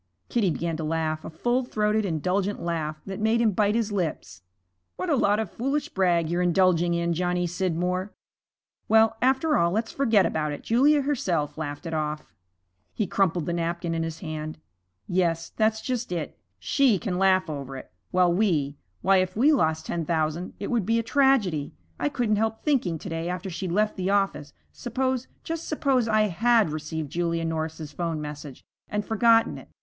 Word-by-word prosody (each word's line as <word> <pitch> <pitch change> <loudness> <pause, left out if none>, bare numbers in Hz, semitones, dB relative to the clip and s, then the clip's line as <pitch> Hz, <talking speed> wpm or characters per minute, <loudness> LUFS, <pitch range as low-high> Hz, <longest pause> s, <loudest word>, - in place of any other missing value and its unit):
Kitty 220 -6 +2
began 165 0 -2
to 160 - -4
laugh, 155 0 -1
a - - -6
full 240 +11 0
throated, 215 -2 0
indulgent 185 +4 -1
laugh, 155 -3 -3
that 195 0 -6
made 220 +2 +2
him 230 -2 +3
bite 205 +2 +2
his 225 -2 0
lips. 180 -6 -3 0.5
'What 365 - -2
a - - +4
lot 210 -4 +2
of 220 -5 -3
foolish 275 +5 -2
brag 175 -4 +2
you're 175 +2 0
indulging 175 -1 +3
in, 170 0 0
Johnny 180 +1 0
Scidmore. 180 +2 -1 0.8
Well, 220 0 +5
after 265 +4 +3
all, 170 - +3
let's 220 +5 -1
forget 225 -8 +3
about 150 -1 -1
it; - - -8
Julia 280 +5 +4
herself 180 - -1
laughed 145 0 -5
it 165 - -4
off.' 150 -1 -3 0.6
He 215 - 0
crumpled 180 -4 +1
the 170 - -2
napkin 170 0 -2
in 165 - -1
his 165 0 -4
hand. 155 -2 -5 0.5
'Yes, 170 -2 0
that's 220 0 +1
just 245 -5 -3
it. 165 -4 -3 0.2
She 225 - +3
can 185 -3 -3
laugh 190 -1 +3
over 140 -3 -5
it, - - -11 0.2
while 180 -1 +3
we 155 -8 +1 0.2
why, 195 +1 +5
if 185 +1 0
we 285 +7 +5
lost 160 - +1
ten 170 - -2
thousand 160 +2 -1
it 200 - -4
would 235 -4 +1
be 230 +1 +3
a 230 - 0
tragedy. 225 - +2 0.2
I 145 - +1
couldn't 215 +3 0
help 220 +1 -1
thinking 245 - +1
to - - -8
day 165 +1 -3
after 180 +1 -4
she'd 180 +1 -4
left 210 +4 +1
the 185 0 -1
office, 195 -7 0 0.2
suppose, 260 +1 -2 0.2
just 330 0 -4
suppose, 270 -6 +1
I 215 -1 +3
had 215 0 +3
received 155 -1 -4
Julia 170 -1 -1
Norris's 160 -1 -3
'phone 165 +1 -3
message 150 -2 -8 0.3
and 210 0 -2
forgotten 225 +1 +3
it. - - -15
180 Hz, 185 wpm, -26 LUFS, 165-220 Hz, 0.8 s, Well